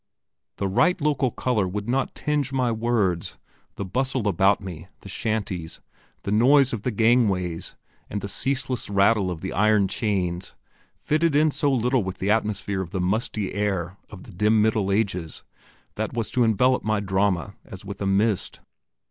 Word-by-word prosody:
The 100 - -2
right 180 - +2
local 140 -4 +1
colour 110 -5 0
would 100 +3 -4
not 130 +2 -1
tinge 145 -3 -1
my 130 -3 +1
words, 110 -7 0 0.4
the 100 - -4
bustle 130 +3 -1
about 100 +1 +3
me, 90 -3 -8
the 100 - -11
shanties, 100 -6 -3 0.4
the 100 - -3
noise 130 +5 +5
of 115 - -3
the 125 - -1
gangways, 105 -7 +1 0.3
and 105 - -3
the 100 - -5
ceaseless 130 +3 -1
rattle 100 0 +3
of 85 -3 -5
the - - -4
iron 105 0 +3
chains, 95 -3 -2 0.4
fitted 155 0 +1
in 155 +1 +4
so 145 0 +1
little 125 -1 +1
with 95 -1 -5
the 100 +2 0
atmosphere 105 -3 0
of 90 - -5
the 95 - -3
musty 100 +2 -1
air 95 -3 -2
of 95 -4 -11
the - - -13
dim 105 +4 +2
Middle 105 -2 +2
Ages, 95 -6 -1 0.5
that - - -2
was 115 -2 -2
to 125 - +2
envelop 125 +3 +3
my 110 -1 +1
drama 100 -1 0
as 95 +1 -11
with 100 0 -7
a 100 - 0
mist. 100 +1 +1
105 Hz, 170 wpm, -24 LUFS, 95-120 Hz, 0.5 s, noise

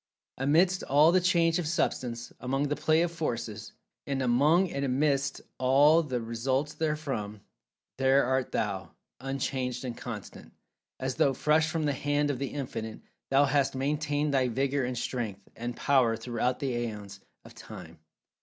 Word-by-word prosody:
Amidst 170 +7 +3
all 150 +4 +5
the 185 +1 +4
change 170 -2 +3
of 170 - -2
Substance—among 130 -1 -2
the 145 - 0
play 160 +2 +2
of 175 - -1
Forces—and 120 -2 -5
among 145 +9 +3
and 140 - -2
amidst 140 +1 0 0.2
all 145 +5 +5
that 130 -6 -3
results 130 +6 -1
therefrom—there 135 -2 -2
art 130 0 0
thou, 95 -5 -3 0.2
unchanged, 130 -1 -3
and 120 -2 -4
constant. 110 -6 -8 0.5
As 130 0 -3
though 135 -2 +3
fresh 155 +3 +2
from 165 -1 -1
the 145 - +1
hand 145 +1 0
of 130 - -4
The 140 - -2
Infinite, 115 -6 -5 0.3
thou 135 +1 +5
hast 140 -1 +1
maintained 145 +1 -1
thy 130 -2 +3
vigor 135 +3 0
and 125 0 -3
strength, 110 -5 -4
and 120 +1 -5
power, 125 -5 +3
throughout 120 +2 -1
the 140 - -2
aeons 110 -4 -5 0.3
of - - -13
Time. - - -11
135 Hz, 145 wpm, -29 LUFS, 120-150 Hz, 0.5 s, all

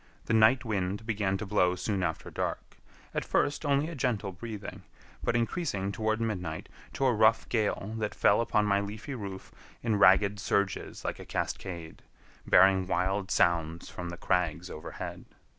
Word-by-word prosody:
The - - -1
night 110 +4 +5
wind 100 -1 -2
began 100 -4 0
to 105 - -5
blow 90 -3 +2
soon 100 +1 -2
after 80 -3 -3
dark; - - -4 0.4
at - - -1
first 145 +1 0
only 140 +2 +2
a 170 - -6
gentle 120 -9 -1
breathing, 105 +2 -7 0.4
but 120 - +1
increasing 115 - -1
toward 110 +1 -1
midnight 90 -8 -3 0.2
to 135 - 0
a 130 - +4
rough 110 0 +4
gale 110 -2 0
that 105 -1 -2
fell 100 - +4
upon 105 -2 +2
my 100 -1 +3
leafy 105 +7 -5
roof 100 -6 -7 0.3
in 110 -3 +1
ragged 100 +1 +5
surges 100 -2 -1
like - - -3
a - - -7
cascade, 85 -3 -4 0.5
bearing 95 -1 +5
wild 95 +1 0
sounds 85 -3 +1
from 90 -1 -6
the 85 - -7
crags 90 -1 0
overhead. 75 - -7
100 Hz, 160 wpm, -29 LUFS, 95-110 Hz, 0.5 s, night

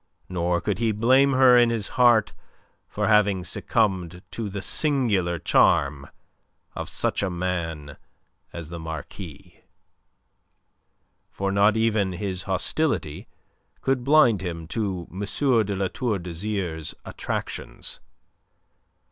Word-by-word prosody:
Nor 85 -1 -1
could 100 -1 -2
he 115 -1 +1
blame 130 +6 +4
her 130 -1 +6
in 120 -1 +5
his 115 -3 -1
heart 120 -4 +4 0.5
for 105 0 -2
having 105 -4 +3
succumbed 90 -2 -1
to 110 -3 -4
the 100 +1 -5
singular 110 - +1
charm 70 -2 +2 0.6
of - - -5
such - - -1
a 100 - 0
man 85 -5 -4 0.5
as 85 -2 -7
the 85 0 -7
Marquis 80 +1 -9 1.7
for 100 0 -3
not 100 +2 +3
even 110 -4 +1
his 95 0 -3
hostility 95 - -1 0.5
could 135 -2 0
blind 130 -8 +4
him 85 -3 -5
to 95 -6 -3
M. 95 - -8 0.5
de 100 0 -3
La 95 0 0
Tour 115 0 -2
d'Azyr's 85 -2 -4
attractions. - - -5
100 Hz, 115 wpm, -24 LUFS, 85-115 Hz, 1.7 s, her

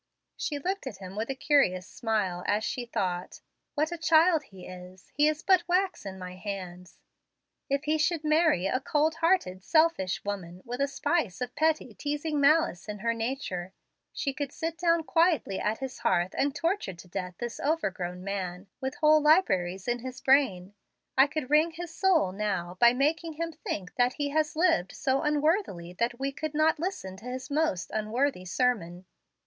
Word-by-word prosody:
She 295 - -3
looked 370 +2 -3
at 215 - -6
him 190 0 -9
with 220 +3 -3
a 270 - -2
curious 260 -11 +2
smile, 205 -6 -2
as 210 +1 +1
she 240 +2 -3
thought, 180 -5 -3 0.4
"What 305 +3 +1
a 345 - -5
child 325 0 +5
he 190 -5 -13
is! 180 0 -12
He 295 +1 +4
is 310 +2 -1
but 375 -2 +5
wax 365 - 0
in 190 0 -6
my 180 0 -8
hands. 185 -3 -7 0.7
If 280 +1 0
he 310 +1 +1
should 315 0 +1
marry 310 - +3
a 255 +6 +1
cold 300 +3 +1
hearted, 330 - +1
selfish 315 - +2
woman, 185 -3 -5
with 245 +3 -4
a 280 - +3
spice 280 - -1
of 250 -1 -4
petty, 310 -5 +1
teasing 295 +3 -2
malice 295 - +3
in 210 - -4
her 230 +3 0
nature, 225 -7 -4 0.4
she 275 - -2
could 285 0 -4
sit 325 +2 -3
down 335 -1 +3
quietly 325 - +2
at 215 +2 0
his 265 -1 -6
hearth 175 0 +1
and 280 +1 0
torture 330 - -1
to 175 +2 -13
death 180 0 -5
this 240 -1 -5
overgrown 185 - -2
man, 185 -2 -4
with 265 +2 -3
whole 305 0 +5
libraries 195 - +3
in 240 0 0
his 255 +1 -7
brain. 240 -10 +2 0.4
I 270 +2 +6
could 285 -2 -4
wring 315 +2 +4
his 340 0 -7
soul 335 - +3
now, 190 -3 -2
by 235 0 +7
making 310 +6 0
him 330 +2 -3
think 190 - -5
that 245 0 +3
he 290 -1 -2
had 305 +1 +2
lived 320 - +2
so 270 -1 0
unworthily 300 - 0
that 240 +1 0
we 275 +1 -1
could 305 +2 -5
not 310 +1 +3
listen 310 - -4
to 215 - -14
his 255 +2 -6
most 290 - 0
unworthy 220 0 -1
sermon." 185 -5 -1
260 Hz, 180 wpm, -28 LUFS, 190-310 Hz, 0.7 s, by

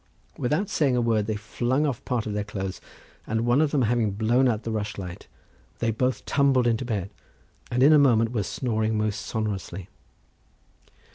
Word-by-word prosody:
Without 150 +11 0
saying 140 -8 +1
a - - +2
word 110 -3 +1
they 110 - -1
flung 120 +7 -1
off 135 -6 -2
part 120 -3 -1
of 105 - -3
their 105 0 -1
clothes, 95 -2 -5 0.5
and 110 +1 0
one 120 +4 +3
of 155 - +3
them 140 -3 +1
having 115 -1 +1
blown 115 +6 +2
out 115 -2 0
the 115 - -3
rushlight, 100 -4 -5 0.5
they 115 -1 0
both 125 +4 -1
tumbled 135 -3 +3
into 120 +1 +1
bed, 105 -6 -3 0.6
and 125 +2 +2
in 150 +3 +7
a 150 - +7
moment 115 -5 +4
were 115 -4 0
snoring 110 0 -1
most 105 -1 -1
sonorously. 100 -4 -4
115 Hz, 180 wpm, -25 LUFS, 105-125 Hz, 0.6 s, in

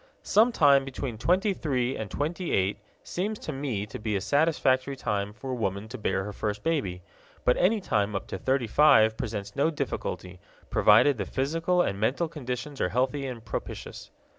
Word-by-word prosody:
Some 225 +4 +4
time 140 -9 +5
between 130 -4 -5
twenty 190 - +2
three 130 -7 -1
and 110 -2 -5
twenty 165 - -3
eight 95 +2 +1 0.2
seems 210 +4 -3
to 155 - -6
me 130 -7 -3
to 105 - -8
be 105 -1 -2
a - - +1
satisfactory 140 - +2
time 100 -5 -2
for 130 +5 -7
a - - -1
woman 100 -3 -2
to - - -6
bear 95 -2 0
her 105 +1 -6
first 105 0 -3
baby; 110 - -1 0.4
but 125 - +4
any 210 +5 +3
time 105 - 0
up 100 - -3
to 95 - -4
thirty 130 +3 +1
five 110 -4 +5
presents 105 -3 -5
no 140 +3 +2
difficulty, 90 - -4 0.3
provided 115 +5 +5
the - - -1
physical 165 +6 +1
and 100 - -2
mental 135 +10 +1
conditions 140 -2 -5
are 90 - +1
healthy 130 +5 0
and 120 -3 -7
propitious. - - -6
130 Hz, 185 wpm, -27 LUFS, 105-150 Hz, 0.4 s, time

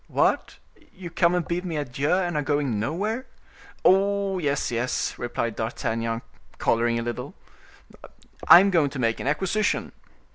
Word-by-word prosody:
"What! - - 0 0.4
you 180 -2 -9
come 170 +1 +2
and 175 -2 -1
bid 175 +1 -2
me 170 -4 -4
adieu, 145 0 -2
and 180 -2 +1
are 150 - +1
going 145 -7 -1
nowhere?" 205 - -2 0.6
"Oh! 195 0 +3
yes, 145 -5 -1
yes," 120 +2 -1
replied 115 -2 -3
D'Artagnan, 115 0 -3 0.3
coloring 115 0 +1
a 115 - -2
little, 120 0 -5 1.1
"I 175 - +10
am 200 0 +2
going 160 -6 +3
to 140 - -8
make 115 -2 0
an - - -4
acquisition." 190 +8 0
150 Hz, 150 wpm, -25 LUFS, 120-180 Hz, 1.1 s, I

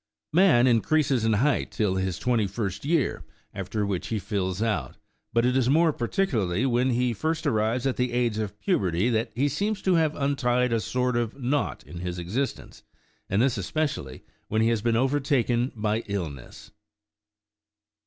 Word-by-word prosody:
Man 165 -9 +5
increases 130 0 +2
in 110 - +3
height 130 +6 +1
till 105 -4 0
his 95 -3 -1
twenty 120 -4 +1
first 100 +1 -4
year, 155 -2 0 0.3
after 100 +2 -3
which 95 -3 -2
he 110 - -1
fills 95 -2 -2
out; 105 - -1 0.3
but 115 +1 +2
it 125 +1 +2
is 130 -2 +2
more 160 +2 +4
particularly 120 - 0
when 125 0 +2
he 125 0 +1
first 160 +7 -2
arrives 115 -1 +1
at 135 - 0
the 125 0 0
age 120 -3 0
of 105 -1 -4
puberty 95 +2 +1
that 115 +1 0
he 135 +4 +2
seems 200 +9 -1
to 190 - +3
have 160 -3 +2
untied 125 -3 +1
a 115 - +2
sort 125 +4 -1
of 120 +2 -2
knot 135 +3 -1
in 85 - -9
his 90 0 -4
existence, 105 +11 -4 0.5
and 100 +5 +2
this 130 -5 +1
especially 100 - -3 0.2
when 110 +1 +1
he 115 - +3
has 115 -3 0
been 115 0 +1
overtaken 130 -2 +1
by 110 0 0
illness. 80 -11 -6
120 Hz, 170 wpm, -26 LUFS, 105-135 Hz, 0.5 s, Man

